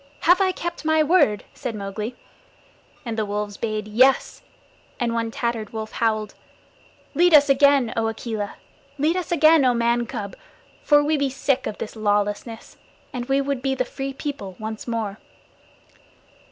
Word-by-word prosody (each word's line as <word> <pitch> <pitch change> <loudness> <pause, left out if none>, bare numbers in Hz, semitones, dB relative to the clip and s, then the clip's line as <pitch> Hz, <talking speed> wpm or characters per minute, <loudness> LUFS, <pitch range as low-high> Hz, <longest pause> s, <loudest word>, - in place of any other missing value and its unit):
Have 360 +3 +5
I 380 -1 +3
kept 345 -2 -5
my 315 0 +3
word?" 300 - +3
said 250 -5 -5
Mowgli. 210 +4 -5 0.9
And 225 -2 -3
the - - +1
wolves 205 0 -3
bayed 215 -2 -3
"Yes," 255 +5 +3 0.6
and 240 -2 0
one 230 -1 -1
tattered 230 -2 -3
wolf 220 -1 -5
howled: 215 -2 -1 0.8
"Lead 350 -1 +5
us 285 -1 +6
again, 275 -3 +4
O 225 -1 0
Akela. 220 -2 -4 0.4
Lead 305 +4 +1
us 365 -2 -3
again, 315 -2 +5
O 250 -2 +3
Man 235 0 +1
cub, 200 -2 -6 0.5
for 290 -1 +4
we 305 +1 +1
be 280 -1 0
sick 270 0 -1
of 210 - -5
this 220 - -6
lawlessness, 210 +1 -2 0.4
and 245 -2 -4
we 270 +1 +2
would 275 -2 -2
be 265 0 0
the 255 -1 -1
Free 270 +2 -5
People 270 - -6
once 220 +1 -6
more." 220 -3 -3
240 Hz, 160 wpm, -23 LUFS, 215-280 Hz, 0.9 s, us